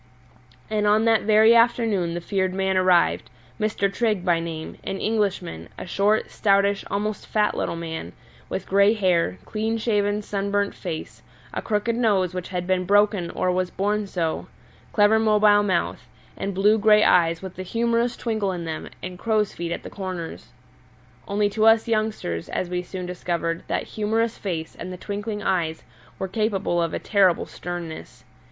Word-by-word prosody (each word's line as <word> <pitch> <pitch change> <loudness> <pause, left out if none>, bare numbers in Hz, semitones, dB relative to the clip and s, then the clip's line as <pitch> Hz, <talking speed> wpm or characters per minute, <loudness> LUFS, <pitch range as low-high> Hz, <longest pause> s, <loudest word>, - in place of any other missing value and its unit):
And 210 -1 0
on 215 +2 +4
that 225 -1 +4
very 220 +1 +6
afternoon 230 -7 +2
the 175 - -3
feared 190 0 -1
man 190 0 0
arrived, 185 -2 +3 0.3
Mr. 210 -2 +1
Trigg 215 -6 0
by 170 -2 +3
name, 165 -1 -6
an 195 - -3
Englishman, 195 - -1
a - - -6
short, 200 +4 +1
stoutish, 200 -1 +2
almost 210 +1 -3
fat 210 -1 +1
little - - -2
man, 160 - -6 0.4
with - - -4
grey 200 +2 +4
hair, 180 - +1
clean 220 +1 -2
shaved 210 -2 0
sunburnt 200 0 -1
face, 165 -4 -6 0.3
a - - -2
crooked 220 +1 0
nose 200 -7 +2
which 180 -1 -4
had 180 -1 -3
been 185 0 +1
broken 205 -2 +3
or 185 - 0
was 185 0 0
born 205 +3 -1
so, 165 -4 -2 0.4
clever 210 +1 +4
mobile 210 -1 +5
mouth, 190 -4 -1 0.3
and 195 -1 -4
blue 210 +3 +4
grey 210 0 +5
eyes 170 0 +3
with 190 -1 -8
a - - -2
humorous 235 +4 0
twinkle 220 -4 -1
in 175 -2 -5
them 160 -1 -5
and 180 -1 -6
crow's 215 -1 +1
feet 170 0 -4
at - - -4
the - - -7
corners. 185 -4 -6 0.8
Only 205 +1 +1
to 220 +1 +2
us 225 0 +5
youngsters, 215 - -2
as 180 - -3
we 180 0 -1
soon 180 0 -6
discovered, 170 -2 -2
that - - -1
humorous 220 +2 -1
face 165 -5 -4
and 185 - -7
the 180 - -6
twinkling 205 +2 -4
eyes 165 -4 -1 0.3
were 190 - -3
capable 195 -3 0
of 165 -1 -1
a - - 0
terrible 190 -4 +2
sternness. 175 -2 -7
200 Hz, 170 wpm, -24 LUFS, 180-215 Hz, 0.8 s, very